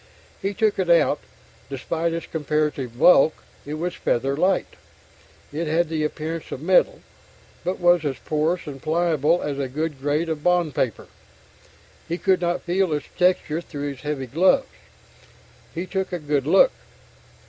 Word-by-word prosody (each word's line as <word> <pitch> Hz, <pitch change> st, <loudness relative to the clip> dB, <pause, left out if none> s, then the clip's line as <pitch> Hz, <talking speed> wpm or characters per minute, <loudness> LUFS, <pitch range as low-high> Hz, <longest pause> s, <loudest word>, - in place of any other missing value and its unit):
He 195 Hz, +1 st, -2 dB
took 215 Hz, -2 st, +1 dB
it 185 Hz, -2 st, 0 dB
out; 170 Hz, -3 st, +4 dB, 0.5 s
despite 160 Hz, +5 st, -2 dB
its 165 Hz, 0 st, -4 dB
comparative 150 Hz, -5 st, -2 dB
bulk, 155 Hz, +1 st, +5 dB, 0.2 s
it 150 Hz, -, -3 dB
was 175 Hz, +3 st, -3 dB
feather 135 Hz, 0 st, 0 dB
light. 185 Hz, +6 st, +1 dB, 0.8 s
It 160 Hz, +2 st, -2 dB
had 160 Hz, +1 st, +1 dB
the 160 Hz, -1 st, -1 dB
appearance 155 Hz, +2 st, -4 dB
of -, -, -4 dB
metal, 185 Hz, -, +3 dB, 0.6 s
but 185 Hz, -, -2 dB
was 175 Hz, -2 st, +4 dB
as 140 Hz, -3 st, -2 dB
porous 160 Hz, +3 st, -1 dB
and 140 Hz, -3 st, -8 dB
pliable 165 Hz, 0 st, +1 dB
as 140 Hz, -1 st, -3 dB
a 135 Hz, -, -1 dB
good 150 Hz, +1 st, -4 dB
grade 150 Hz, +4 st, 0 dB
of 160 Hz, -2 st, -3 dB
bond 175 Hz, -3 st, +2 dB
paper. 115 Hz, -6 st, -1 dB, 1.0 s
He 170 Hz, -, -2 dB
could 185 Hz, -1 st, +2 dB
not 175 Hz, 0 st, -1 dB
feel 180 Hz, 0 st, +1 dB
its 150 Hz, -1 st, -3 dB
texture 180 Hz, -3 st, +1 dB
through 145 Hz, -3 st, -5 dB
his 135 Hz, -2 st, -11 dB
heavy 145 Hz, -2 st, -3 dB
gloves. 165 Hz, +10 st, +3 dB, 1.1 s
He 170 Hz, +3 st, -3 dB
took 190 Hz, 0 st, -3 dB
a 180 Hz, -, -1 dB
good 145 Hz, -3 st, -1 dB
look. -, -, +6 dB
160 Hz, 160 wpm, -23 LUFS, 145-175 Hz, 1.1 s, look